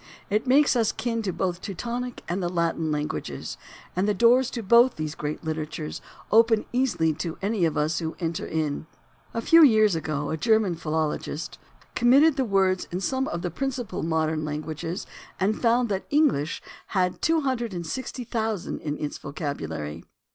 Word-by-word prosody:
It 215 +5 +1
makes 280 +2 +5
us 225 -3 +2
kin 230 0 -2
to 200 -4 -1
both 180 0 -1
the - - -23
Teutonic 240 +5 -4
and 180 +3 -2
the 175 - -1
Latin 165 -2 0
languages, 150 - -3 0.4
and 185 +3 +1
the 210 - +2
doors 240 +4 +5
to 235 -4 -5
both 235 +5 +5
those 155 -1 -3
great 150 +1 -4
literatures 155 -1 -4 0.3
open 225 0 +5
easily 175 -12 +2
to 165 +2 -5
any 200 -3 +1
of 160 - -1
us 150 +1 +1
who 160 -2 -2
would - - -11
enter 165 0 -2
in. 155 -1 -2 0.5
A 230 - -1
few 330 +5 +7
years 215 -7 +6
ago 155 -2 -2
a 160 - -1
German 220 -1 +3
philologist 155 -1 -3
(German, - - -30
of - - -30
course) - - -32
comited 275 +6 +5
the 265 -2 +1
words 190 -3 +2
in 180 - -2
some 265 +7 -1
of 170 - -4
the 175 - -2
principal 245 - -3
modern 160 -1 0
languages 155 +4 -4 0.3
and 205 +3 0
found 240 +1 +3
that 195 -2 -2
English 285 - +2 0.3
had 180 -1 +1
260,000 235 - -2
in 150 -1 -3
its 150 - -4
vocabulary. 80 - -5
185 Hz, 175 wpm, -26 LUFS, 160-235 Hz, 0.5 s, few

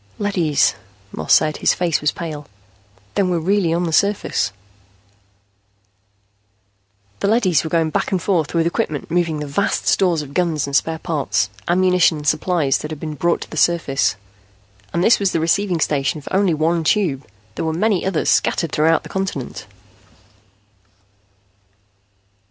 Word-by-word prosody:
"Leadys," 165 -9 +1 0.4
Moss 80 - -4
said. 155 -1 +4
His - - +2
face 175 -3 0
was 150 - +2
pale. 155 -3 -7 0.7
"Then 195 -2 +1
we're 175 - +1
really 180 +1 +1
on 170 +2 0
the 165 -2 -2
surface." 195 - +1 2.7
The - - 0
leadys 195 - +2
were 160 - -4
going 160 -1 +1
back - - -1
and 190 - +1
forth 170 -4 -1
with 165 -1 +2
equipment 165 - -2
moving 170 -2 0
the 150 - -4
vast 200 +10 -1
stores 175 -5 +2
of 140 -1 -11
guns 170 -4 0
and 140 0 -4
spare 160 +3 +1
parts, 145 - -1 0.2
ammunition 180 -2 +3
and 150 0 -6
supplies 155 -2 +1
that 150 - -6
had 155 -2 -7
been 155 0 -5
brought 170 +3 0
to - - -8
the - - -7
surface. 165 -9 +1 0.8
And 170 - 0
this 230 - +5
was 195 -2 0
the 165 - +1
receiving 175 +2 +1
station 145 0 0
for 150 - -10
only 190 -4 +2
one 165 +2 0
Tube; 155 -7 0 0.3
there - - -4
were 160 - 0
many 195 +3 0
others, 190 -5 0
scattered 165 - +1
throughout 160 +2 +2
the - - -9
continent. 190 -10 -4
165 Hz, 155 wpm, -19 LUFS, 150-180 Hz, 2.7 s, this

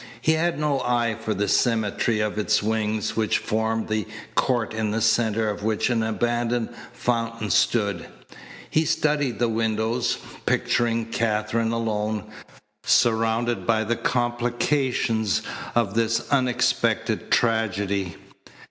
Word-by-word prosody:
He 155 - +2
had 165 +2 +1
no 150 -2 +1
eye 120 -3 0
for 110 -1 -2
the 100 +1 0
symmetry 110 -1 +1
of 105 0 -1
its 105 0 +2
wings 110 -1 -1
which 110 -1 +1
formed 110 +1 -1
the 110 -2 -1 0.3
court 120 -4 +1
in 110 -1 -1
the 110 +2 -1
centre 110 0 +2
of 105 -1 -3
which 110 +3 0
an 115 -2 +1
abandoned 120 +1 0 0.2
fountain 115 -3 -2
stood. 100 -6 +1 0.6
He 155 - +2
studied 145 -6 0
the 120 - +2
windows, 115 +1 0 0.3
picturing 115 -1 +1
Katherine 115 0 0
alone, 110 -2 -1 0.6
surrounded 115 +1 +2
by 110 -1 +3
the 115 +2 0
complications 120 -2 0 0.3
of 115 -5 +1
this 115 0 0
unexpected 120 -4 +1
tragedy. 100 -5 +1
115 Hz, 120 wpm, -24 LUFS, 110-120 Hz, 0.6 s, by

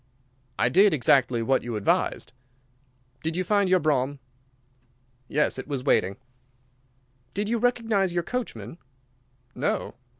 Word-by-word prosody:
"I - - +3
did 195 -2 +5
exactly 125 -2 +3
what 130 +3 +2
you 120 -2 -4
advised." 105 +3 0 0.9
"Did 160 +1 -3
you 185 - 0
find 200 0 +2
your 185 - +5
brougham?" 145 -3 0 1.1
"Yes, 150 -2 0
it - - -7
was 140 -3 -3
waiting." 95 -8 +2 1.2
"Did 205 +2 -1
you 235 +1 0
recognise 225 -6 +1
your 175 0 -1
coachman?" 165 - -5 0.7
"No." - - -2
160 Hz, 125 wpm, -26 LUFS, 130-200 Hz, 1.2 s, did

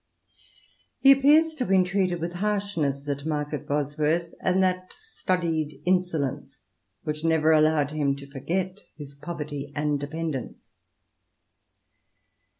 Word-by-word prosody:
He 275 - +8
appears 295 +4 +5
to 310 - -19
have 250 - 0
been 190 -1 +5
treated 180 -2 0
with 170 +1 -3
harshness 175 -8 -1
at 140 -1 -2
Market 150 -2 -3
Bosworth, 150 +4 0
and 185 +1 +2
that 185 0 0
studied 170 - -2
insolence 175 -7 -1 0.4
which 150 0 -4
never 160 -1 +3
allowed 155 -2 +3
him 145 -3 0
to 140 0 -10
forget 175 +8 -3 0.2
his 145 -2 -9
poverty 145 -1 -6
and 145 -1 0
dependence. 145 -2 -5
160 Hz, 120 wpm, -26 LUFS, 145-185 Hz, 0.4 s, He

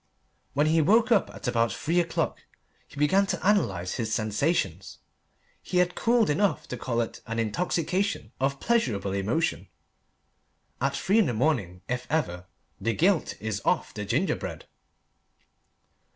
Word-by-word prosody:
When 145 +2 +3
he 160 +1 +3
woke 220 +9 +4
up 220 - +4
at - - -8
about 115 -1 +2
three 170 +3 0
o'clock, 170 -1 -1 0.5
and - - -15
began 190 +8 +3
to 190 - -2
analyse 95 - +1
his 115 -3 -2
sensations, 105 - -1 0.6
he 180 - -3
had 180 0 +3
cooled 235 -1 +2
enough 200 +6 +1
to - - -3
call 120 0 -1
it 115 - -5
an 115 0 -3
intoxication 170 - -1
of 135 +1 0
pleasurable 115 - 0
emotion. 110 +12 -1 1.1
At - - +1
three 200 +4 +2
in 210 - +4
the 120 - -1
morning, 110 - 0
if 125 0 -3
ever, 95 - -1 0.3
the 115 0 -1
gilt 180 0 +1
is 110 -1 -3
off - - 0
the 105 - -5
ginger 125 - +1
bread. - - -7
140 Hz, 150 wpm, -27 LUFS, 110-180 Hz, 1.1 s, woke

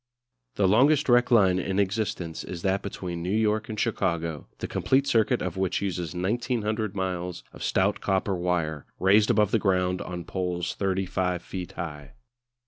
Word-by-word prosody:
The 100 - +3
longest 140 +9 +4
direct 120 0 +4
line 95 -6 +5
in 95 +1 -2
existence 100 -4 -1
is 85 -2 -7
that 95 0 +1
between 90 -3 -5
New 90 - -3
York 110 0 +1
and 110 -1 -4
Chicago, 85 -8 -1
the - - -5
complete 135 +1 +1
circuit 120 -2 +2
of 90 0 -4
which 95 -1 0
uses 90 -4 -3
1900 110 +1 -1
miles 90 -2 -3
of - - -12
stout 100 +2 +1
copper 95 0 0
wire, 85 -4 -1
raised 105 +3 +4
above 105 -1 +3
the 115 - +3
ground 90 -2 +1
on 90 -1 -5
poles 90 -1 -2
35 95 -2 -1
feet 90 -2 -6
high. 75 -5 -7
95 Hz, 160 wpm, -26 LUFS, 90-105 Hz, -, line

